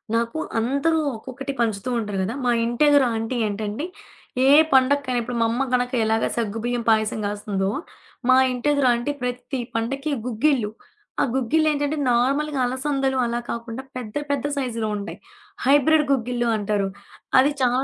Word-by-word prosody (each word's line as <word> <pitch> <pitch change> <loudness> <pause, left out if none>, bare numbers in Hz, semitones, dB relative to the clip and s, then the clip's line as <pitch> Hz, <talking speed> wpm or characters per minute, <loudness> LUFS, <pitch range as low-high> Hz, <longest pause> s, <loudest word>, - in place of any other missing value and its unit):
నాకు 230 +6 -1 0.2
అందరూ 280 +8 +1 0.2
ఒక్కొక్కటి 265 +4 -6
పంచుతూ 220 -1 0
ఉంటారు 205 -3 -3
కదా. 205 +5 -2
మా 245 - +3
ఇంట 235 0 -3
ఎదురు 285 -2 +5
ఆంటి 225 +3 -2
ఏంటంటే, 210 +6 -3 0.6
ఏ - - +5 0.3
పండగకైనా 265 -1 +3
ఇప్పుడు 240 +1 -4
మా - - +4
అమ్మ 240 +3 -1
గనక 250 0 +1
ఎలాగ 220 0 +1
సగ్గుబియ్యం 235 +2 -2
పాయసం 220 0 +2
కాస్తుందో, 205 -1 -2 0.6
మా 255 - +7
ఇంటెదురా 265 +1 +2
అంటి 240 +5 -2
ప్రతి 250 +2 -3 0.2
పండగకి 270 +6 -2
గుగ్గిళ్లు. 250 -2 +1 0.5
ఆ - - +4
గుగ్గిల్లేంటంటే 290 +3 +1
నార్మల్‌గా 275 +4 +1
అలసందలు 265 +1 -1
అలా 235 0 -1
కాకుండా 235 +2 -5
పెద్ద 235 -4 -7 0.2
పెద్ద 280 -1 -1
సైజులో 230 -5 -2
ఉంటాయి. 205 +1 -7 0.5
హైబ్రిడ్ 290 +3 +4
గుగ్గిల్లు 245 -2 0
అంటారు. 205 -1 0 0.5
అది 275 +3 +4
చాల 250 +1 +2
245 Hz, 140 wpm, -23 LUFS, 225-275 Hz, 0.6 s, మా